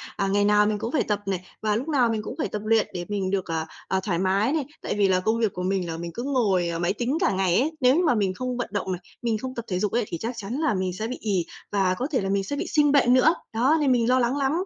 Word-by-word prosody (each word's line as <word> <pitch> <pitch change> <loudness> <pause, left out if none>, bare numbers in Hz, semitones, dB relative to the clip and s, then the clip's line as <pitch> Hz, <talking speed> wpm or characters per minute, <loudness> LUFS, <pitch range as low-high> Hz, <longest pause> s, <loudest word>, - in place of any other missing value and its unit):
à, 195 - 0
ngày 205 +1 +2
nào 210 0 +4
mình 210 0 0
cũng 230 +3 -3
phải 300 - +1
tập 210 -1 -1
này, 185 -2 -3 0.2
và 215 -1 +1
lúc 250 +7 -2
nào 265 -7 +3
mình 220 -1 -1
cũng - - -7
phải - - -1
tập 210 - -5
luyện 225 -1 +3
để 175 -1 -4
mình 195 -2 -1
được, 195 -2 0
à, 160 -1 -2 0.2
à, 190 - +1
thoải 175 -4 -1
mái 195 +7 +2
này. 310 -4 0 0.2
Tại - - -3
vì 200 -1 +4
là 185 -1 +3
công 220 +4 0
việc 220 -4 +1
của 180 - -4
mình 185 -1 0
là 165 - -4
mình 170 0 -5
cứ 240 - -5
ngồi, 205 -11 +1
à, 165 - -3
máy 175 +2 +1
tính 245 +7 -1
cả 350 - +3
ngày 185 -1 +2
ấy. 295 +6 +1
Nếu 255 +1 +5
như 355 - +2
mà 300 - +3
mình 200 -4 +1
không 250 +4 -4
vận 245 - -3
động 200 -2 -2
này, 180 -1 -4 0.2
mình 230 -2 0
không 255 +3 -6
tập 235 - -5
thể 180 -2 -1
dục 210 +1 0
ấy 240 0 +1
thì 170 - -4
chắc 230 +7 -4
chắn 220 +1 -5
là 310 -1 +1
mình 185 -2 -1
sẽ 215 +5 -4
bị 250 - -5
ì 195 -6 0 0.3
và 195 -3 +2
có 250 +8 -2
thể 260 - +1
là 195 - -2
mình 195 0 +1
sẽ 285 - -4
bị - - -3
sinh 295 -2 +3
bệnh 270 -4 +4
nữa. 260 +6 +5 0.2
Đó, 260 +8 +3
nên 280 -3 +3
mình 240 -1 +2
lo 255 +1 +4
lắng 245 +3 +1
lắm. 275 -1 +1
215 Hz, 325 wpm, -25 LUFS, 190-250 Hz, 0.3 s, Nếu